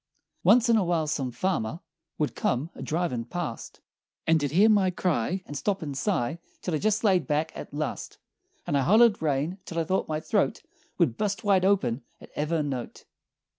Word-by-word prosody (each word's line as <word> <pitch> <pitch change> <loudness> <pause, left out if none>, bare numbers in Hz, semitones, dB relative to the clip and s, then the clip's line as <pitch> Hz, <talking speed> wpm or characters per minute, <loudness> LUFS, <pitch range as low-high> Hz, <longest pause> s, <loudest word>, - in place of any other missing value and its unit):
"Once 245 0 +6
in 230 -1 +5
a 210 - +3
while 170 -3 +1
some 140 -4 -1
farmer 135 0 -2 0.4
Would 150 - -1
come 135 +7 -1
a - - -10
driven' 160 -7 -1
past 140 -1 -6 0.4
And 160 -1 +3
he'd 145 - 0
hear 190 +9 +5
my 205 -4 +4
cry, 180 0 -1
And 145 - -8
stop 190 +6 -1
and 145 -3 -5
sigh 160 - -1 0.2
Till 180 - -2
I 155 - +1
jest 215 +4 +1
laid 190 -5 +3
back, 155 +1 0
at - - -8
last, 150 0 -4 0.5
And - - -1
I 140 - +3
hollered 215 - +5
rain 155 +5 -1
till 165 - -7
I 165 - +2
thought 185 +4 0
my 155 -1 -2
throat - - 0 0.3
Would 115 - +2
bust 210 +2 -1
wide 195 -3 +3
open 185 -11 +2 0.2
at - - -14
ever' 155 +1 0
note! 130 -4 -5
165 Hz, 190 wpm, -27 LUFS, 145-190 Hz, 0.5 s, Once